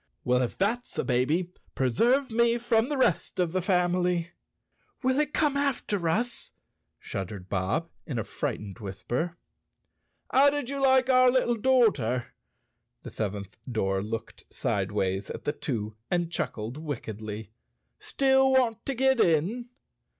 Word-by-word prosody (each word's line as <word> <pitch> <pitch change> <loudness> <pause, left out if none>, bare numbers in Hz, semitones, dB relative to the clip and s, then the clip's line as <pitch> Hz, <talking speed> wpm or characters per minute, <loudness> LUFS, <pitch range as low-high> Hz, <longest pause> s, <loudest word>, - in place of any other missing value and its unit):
"Well, 125 0 +2
if 125 - -2
that's 230 +6 -1
the - - 0
baby, 150 +8 +1 0.2
preserve 235 - +2
me 235 +1 +3
from 235 0 +1
the 295 - -1
rest 190 -6 +1
of 175 -2 +1
the 185 +1 0
family!" 180 -2 +1 0.7
"Will 260 +2 +2
it 300 -1 +1
come 295 -2 +1
after 235 -11 0
us?" 235 +7 -1 0.5
shuddered 95 -1 -6
Bob, 100 - -1 0.2
in 135 -7 -3
a 115 - -1
fright¬ - - -3
ened 105 +2 -9
whisper. 120 - -3 0.9
"How 275 +2 +6
did 285 -2 -3
you 280 0 -3
like 260 -1 +4
our 255 0 +6
little 250 -1 +2
doorter?" 205 - +2 0.7
The - - -8
seventh 100 -2 -4 0.2
door 95 -4 0
looked 110 +2 -6
sideways 95 -1 -1
at - - -6
the 145 - -1
two 110 -8 -4
and 175 -1 0
chuckled 120 -2 -4
wick¬ 145 -6 -3
edly. 110 -1 -6 0.5
"Still 265 -1 +3
want 245 -4 +2
to 275 - -1
get 265 0 +3
in?" 195 +9 +2
175 Hz, 145 wpm, -28 LUFS, -, 0.9 s, How